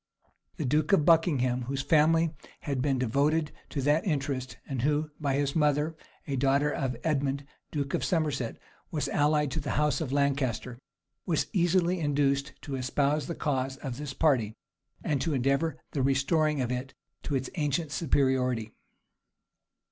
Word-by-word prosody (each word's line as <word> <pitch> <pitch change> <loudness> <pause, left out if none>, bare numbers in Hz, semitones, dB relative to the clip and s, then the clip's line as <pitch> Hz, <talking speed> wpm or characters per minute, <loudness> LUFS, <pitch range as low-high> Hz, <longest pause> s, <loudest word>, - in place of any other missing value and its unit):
The 155 - -2
duke 150 +9 +2
of 155 -6 +4
Buckingham, 135 -7 +3
whose 135 0 -2
family 160 +2 +3 0.3
had 140 -3 -2
been 135 -1 +1
devoted 145 +6 +1 0.2
to 140 - -3
that 145 +3 +3
interest, 140 -6 -2
and 135 -4 -3
who, 150 +3 +1
by 140 -3 0
his 140 0 0
mother, 150 0 +2 0.3
a 140 - -2
daughter 140 +3 +2
of 130 -5 -2
Edmund, 140 -2 0 0.2
duke 140 -2 -3
of - - 0
Somerset, 150 -8 -1 0.3
was 150 -4 -2
allied 150 -1 +2
to 160 - -2
the 140 -3 -3
house 150 -2 +2
of 145 -5 -3
Lancaster, 135 -4 0 0.5
was 165 -4 +1
easily 180 0 +2
induced 140 -2 +1
to 140 - -6
espouse 140 +3 0
the 170 - -3
cause 135 -2 -1
of 130 -4 -5
this 145 -2 -5
party, 125 -9 +2 0.5
and 140 -3 0
to 160 -4 0
endeavor 140 +5 +1
the 140 - -1
restoring 140 +2 +2
of 125 -1 -1
it 125 +2 -4 0.3
to 145 - -2
its 130 -1 -2
ancient 150 -1 -1
superiority. 130 -7 +1
140 Hz, 155 wpm, -29 LUFS, 135-155 Hz, 0.5 s, of